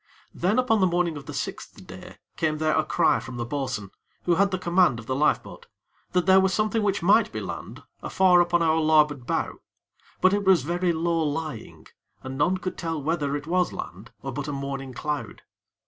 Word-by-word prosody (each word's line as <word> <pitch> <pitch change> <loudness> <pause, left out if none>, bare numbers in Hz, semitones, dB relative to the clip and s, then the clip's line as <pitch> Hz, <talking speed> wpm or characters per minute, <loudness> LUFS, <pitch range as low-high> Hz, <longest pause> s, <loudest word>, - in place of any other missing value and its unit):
Then 185 +6 0
upon 250 -4 +2
the 190 - +4
morning 175 -2 0
of 145 - -9
the - - -6
sixth - - -6
day - - -11 0.2
came 155 -1 0
there 155 0 +1
a 155 - +2
cry 165 +2 +2
from 120 +1 -8
the 120 - -3
bo'sun, 125 -7 -4 0.3
who 175 - +2
had 200 +3 +3
the 190 - -2
command 175 -7 +2
of 115 - -9
the 130 - -2
lifeboat, 150 +3 -1 0.5
that 180 -2 +2
there 190 +1 +6
was 190 -1 +2
something 215 +2 +1
which 200 -3 0
might 210 +4 +4
be - - -4
land - - -7 0.2
afar 180 -2 +4
upon 175 -1 +2
our 160 -1 +3
larboard 150 -5 +2
bow; - - -2 0.6
but 185 +1 +4
it 205 0 +1
was 190 -7 +4
very 175 +3 0
low 165 0 0
lying, 150 -5 -4 0.4
and 130 0 -6
none 150 +7 +1
could 185 0 -6
tell 165 -2 -3
whether 145 -1 -1
it 145 - -9
was 180 +1 +1
land 100 +6 -8
or 135 - -4
but 145 +3 -5
a - - -3
morning 135 -1 -5
cloud. 140 -3 -5
160 Hz, 205 wpm, -25 LUFS, 140-185 Hz, 0.6 s, there